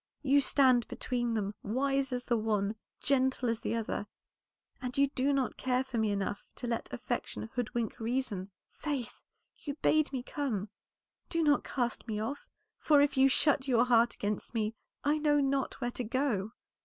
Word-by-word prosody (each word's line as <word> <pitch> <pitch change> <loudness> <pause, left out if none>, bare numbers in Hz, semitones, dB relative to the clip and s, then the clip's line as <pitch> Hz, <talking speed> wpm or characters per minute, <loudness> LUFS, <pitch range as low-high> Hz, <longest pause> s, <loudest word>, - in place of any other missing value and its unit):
You 285 0 +5
stand 255 -4 +4
between 240 -2 -2
them, 205 -1 -1
wise 270 +4 0
as 245 -1 -2
the 240 - +2
one, 215 -2 0 0.3
gentle 260 -2 +2
as 230 -1 -1
the - - -1
other, 220 -2 -2 0.7
and 250 0 -4
you 280 0 +4
do 275 +1 +1
not 270 -3 0
care 255 0 +1
for 260 -3 -3
me 220 -1 +2
enough 200 0 -2
to - - -6
let 235 -1 -2
affection 225 - -4
hoodwink 235 -1 -2
reason. 225 -5 -2 0.2
Faith, 280 -7 -4 0.3
you 285 -2 -6
bade 310 -1 +2
me 260 -3 -3
come; 230 -9 -2 0.6
do 335 -1 +1
not 295 -1 +4
cast 245 -2 -2
me 215 -2 -2
off, 230 +7 -4 0.3
for 295 -2 +5
if 285 0 +3
you 270 0 +6
shut 280 0 +2
your 245 -2 +4
heart 235 -1 +4
against 210 +3 -3
me 215 -1 0 0.3
I 295 +1 +2
know 295 -1 +3
not 275 -1 0
where 245 -2 -1
to 250 - -4
go." 230 -4 -1
250 Hz, 175 wpm, -31 LUFS, 225-275 Hz, 0.7 s, you